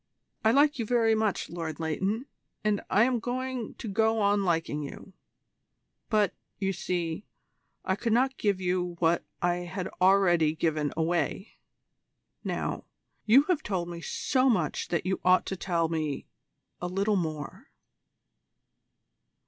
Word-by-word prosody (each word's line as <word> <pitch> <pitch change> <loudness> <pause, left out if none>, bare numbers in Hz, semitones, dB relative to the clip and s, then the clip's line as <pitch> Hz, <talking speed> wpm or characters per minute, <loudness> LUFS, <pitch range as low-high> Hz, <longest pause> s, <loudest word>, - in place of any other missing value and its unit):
I 220 - +5
like 285 +3 +4
you 230 - 0
very 230 -2 +3
much, 220 -2 0
Lord 165 -3 -5
Leighton, 190 - -1 0.4
and 210 -1 +1
I 210 - +5
am 250 -1 +2
going 250 0 -3
to - - -7
go 220 +2 +2
on 205 -1 +3
liking 165 -4 0
you; 150 +6 -9 1.0
but, 210 -3 +2 0.2
you 195 -1 -1
see, 175 0 -3 0.6
I 190 - +1
could 230 +3 -2
not 260 +4 +3
give 200 -3 +1
you 180 -1 -1
what 170 0 +2 0.2
I 175 0 +2
had 180 +1 -4
already 175 -5 +4
given 155 -3 0
away. 170 +4 -1 0.8
Now, - - -3 0.4
you 255 +6 +7
have 320 -1 0
told 180 - -2
me 170 -1 -6
so 260 - +1
much 175 -11 0
that 170 -1 -1
you 190 0 -1
ought 185 0 +4
to 190 - -3
tell 170 -3 0
me 155 -3 -2 0.6
a 180 - -1
little 200 +4 +1
more. 155 -5 -4
190 Hz, 140 wpm, -28 LUFS, 170-220 Hz, 1.0 s, you